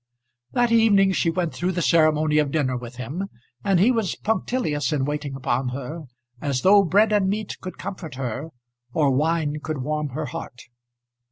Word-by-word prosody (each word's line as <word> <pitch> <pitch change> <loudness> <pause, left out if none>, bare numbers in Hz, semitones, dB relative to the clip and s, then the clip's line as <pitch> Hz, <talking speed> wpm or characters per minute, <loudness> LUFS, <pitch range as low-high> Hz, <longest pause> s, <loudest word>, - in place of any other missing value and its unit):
That 240 -1 +2
evening 205 -4 +5
she 180 -2 +1
went 170 -1 -1
through 180 +2 -1
the 175 - -1
ceremony 155 -2 +3
of 150 -2 +1
dinner 135 -4 0
with 120 0 -7
him, 140 +10 -4 0.4
and 195 -3 +3
he 215 +8 +5
was 225 -6 0
punctilious 210 - -1
in 140 -3 0
waiting 145 -1 -3
upon 130 -1 -1
her 140 +5 -6 0.4
as 140 -3 -1
though 200 +2 +7
bread 205 +4 +3
and 205 -2 +3
meat 210 +1 -3
could 185 - -7
comfort 180 -7 -7
her 130 +3 -4 0.5
or 145 -3 +3
wine 150 +2 0
could 155 -5 -4
warm 150 +1 -2
her 155 - -2
heart. 125 -3 -7
155 Hz, 175 wpm, -24 LUFS, 140-195 Hz, 0.5 s, though